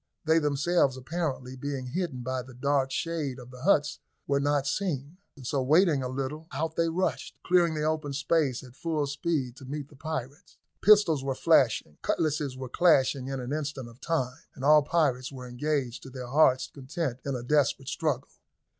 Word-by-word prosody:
They 160 +1 +4
themselves, 145 -1 +2
apparently 130 -3 -3
being 135 0 -4
hidden 135 -2 -3
by 130 +1 -2
the 130 0 -13
dark 140 +1 +1
shade 155 -3 -2
of 125 -1 -11
the 125 -1 -11
huts, 150 -3 +2 0.3
were 140 0 +1
not 145 -1 +1
seen. 155 -2 -2 0.3
So, 135 +2 0
waiting 155 +2 +4
a 130 - -2
little, 140 +5 -4
out 160 +3 -2
they 165 0 +2
rushed, 180 +3 -2
clearing 175 -3 +3
the 150 - -1
open 155 -2 -1
space 145 -2 +1
at 125 -1 -14
full 155 -1 -1
speed 140 -3 -2
to 135 - -11
meet 145 +1 -5
the 150 - -17
pirates. 145 +1 -6 0.2
Pistols 205 -9 +5
were 135 -1 -1
flashing, 75 -10 +2
cutlasses 150 -4 -1
were 130 0 -5
clashing 135 -3 +3
in 135 -1 -3
an 125 +2 -4
instant 145 -4 -3
of 120 +2 -15
time, 130 -6 -1 0.2
and 130 - -5
all 150 +1 +7
parties 140 -5 +1
were 130 -2 -8
engaged 130 -1 -2
to 135 - -10
their 125 -2 -7
hearts' 130 -2 +4
content 135 -1 -4
in 140 -1 -2
a 120 - -4
desperate 135 -1 +1
struggle. 150 -6 -1
140 Hz, 180 wpm, -28 LUFS, 130-155 Hz, 0.3 s, all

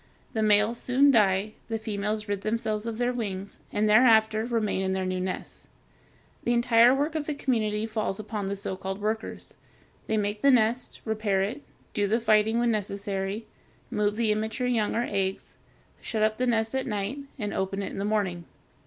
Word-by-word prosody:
The 220 - 0
males 215 +2 +3
soon 275 +3 +4
die; 210 -2 +3 0.2
the 225 - -1
females 210 0 -3
rid 205 -1 -2
themselves 215 0 -1
of 225 -1 -3
their 245 +1 0
wings, 200 -5 -5
and 210 +1 +1
thereafter 220 -1 +5
remain 220 -5 0
in 190 0 0
their 190 0 -1
new 185 0 -1
nests. 185 0 -5 0.8
The 240 - +1
entire 235 0 +6
work 290 +4 +1
of 310 -2 -3
the 300 - -2
community 220 -6 0
falls 215 -3 -2
upon 210 -1 -4
the 200 - -2
so 195 -1 -4
called 190 +1 -5
workers. 220 +2 -4 0.5
They 220 - +1
make 205 0 -1
the 280 - +5
nest, 240 -1 +2
repair 215 -3 0
it, 240 +9 -3 0.3
do 205 -1 +1
the 225 +4 +2
fighting 220 0 +3
when 240 0 +2
necessary, 200 0 -3 0.5
move 210 0 +1
the 225 -1 +1
immature 220 +4 -1
young 230 -4 +1
or 235 +1 +1
eggs, 195 -1 -2 0.5
shut 220 -2 -1
up 215 +1 +1
the 255 - +1
nest 225 -1 +1
at 265 0 -1
night, 210 +4 -2 0.2
and 205 -1 -3
open 195 +1 -2
it - - -4
in - - -6
the - - -1
morning. 200 -5 -1
215 Hz, 190 wpm, -27 LUFS, 200-230 Hz, 0.8 s, entire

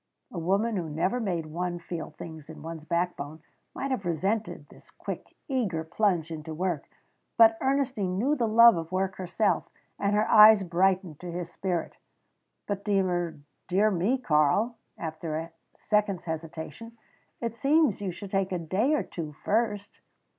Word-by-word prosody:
A 175 - -4
woman 200 +6 +1
who 170 -3 -3
never 170 +10 0
made 180 -8 -2
one 175 +3 -3
feel 170 -1 -6
things 160 -2 -9
in 160 - -10
one's 160 -1 -7
backbone 160 -3 -2 0.3
might 275 0 -3
have 250 -6 -1
resented 195 +6 -2
the - - -17
quick, - - -7
eager 215 - -1
plunge 170 -1 0
into 155 0 -6
work, 175 -3 -2 0.5
but 225 -1 +7
Ernestine 260 -9 0
knew 270 +9 +2
the 240 -5 0
love 230 -1 +7
of 165 0 -5
work 190 +1 -1
herself, 190 +3 0 0.3
and 200 +1 +1
her 215 +1 +2
eyes 215 -2 +8
brightened 180 -2 +1
to 175 -1 -6
his 175 0 -5
spirit. 175 -2 -3 0.7
"But 200 -1 -3
dear 180 -6 0 0.5
me, 195 +8 +1
Karl," 185 - +2 0.2
after 160 -1 -4
a 165 +1 -5 0.3
second's 210 -4 0
hesitation, 160 +7 -6 0.4
"it 230 -1 -3
seems 275 - +3
you 200 - -2
should 190 +2 -8
take 195 -1 0
a 180 - 0
day 190 - +1
or - - 0
two 155 -3 -6
first." 205 +4 -1
185 Hz, 155 wpm, -28 LUFS, 165-215 Hz, 0.7 s, eyes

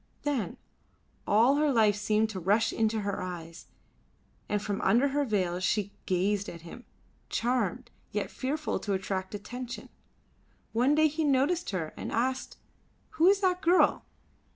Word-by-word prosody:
Then 265 -11 -2 0.7
all 235 +7 +4
her 300 -1 +3
life 220 -5 +4
seemed 215 +1 +1
to 190 - -5
rush 200 +6 +2
into 220 -1 +1
her 200 -2 -3
eyes, 170 -2 -7 0.8
and 210 - +1
from 205 -1 -3
under 255 +5 +3
her 290 +1 +1
veil 185 -6 0
she 200 +2 0 0.2
gazed 195 +3 0
at 170 - -9
him, 175 +9 -11 0.4
charmed, 240 0 -1 0.2
yet 210 -1 -2
fearful 300 +4 -2
to 205 - -2
attract 190 +1 -3
attention. 245 +4 -7 0.8
One 250 +6 +3
day 310 0 +5
he 310 +2 -2
noticed 290 +5 +2
her 165 -5 -3
and - - -6
asked, 255 +3 -1 0.5
"Who 365 -6 +2
is 395 +1 +5
that 365 -1 +1
girl?" 360 0 +4
220 Hz, 150 wpm, -29 LUFS, 200-275 Hz, 0.8 s, day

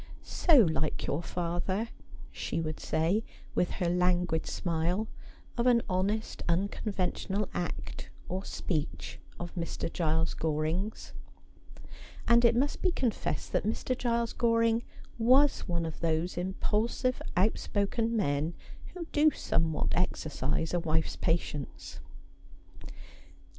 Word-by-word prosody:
' - - -16 0.2
So 335 - +8
like 160 -5 0
your 145 - 0
father,' 180 +6 -2 0.4
she - - -3
would 155 -1 -3
say, 165 +8 +1 0.3
with 180 - +2
her 175 - -1
languid 180 -2 +2
smile, 175 +4 0 0.5
of 235 - +3
any 235 -2 +5
honest 200 +4 -1
unconventional 195 +2 0
act 175 -1 -4 0.2
or 185 +2 -3
speech 155 -6 -3 0.2
of 175 0 -5
Mr. 170 -1 -3
Giles 160 -1 +1
Goring's; 160 +7 -2 1.1
and 235 0 +6
it 235 -1 +5
must 275 +4 +1
be 370 - +3
confessed 230 - -1
that - - +1
Mr. 225 +4 -1
Giles 235 -2 0
Goring 230 -1 +3 0.4
was 260 +5 +5
one 170 -2 0
of 160 - -5
those 165 +1 0
impulsive 210 +7 0 0.2
outspoken 220 +3 +1
men 155 -3 0 0.4
who 350 -2 -4
do 310 0 +5
somewhat 165 - 0
exercise 155 -3 -1
a 175 - +3
wife's 160 -1 0
patience. 100 - -2
180 Hz, 115 wpm, -30 LUFS, 160-225 Hz, 1.1 s, So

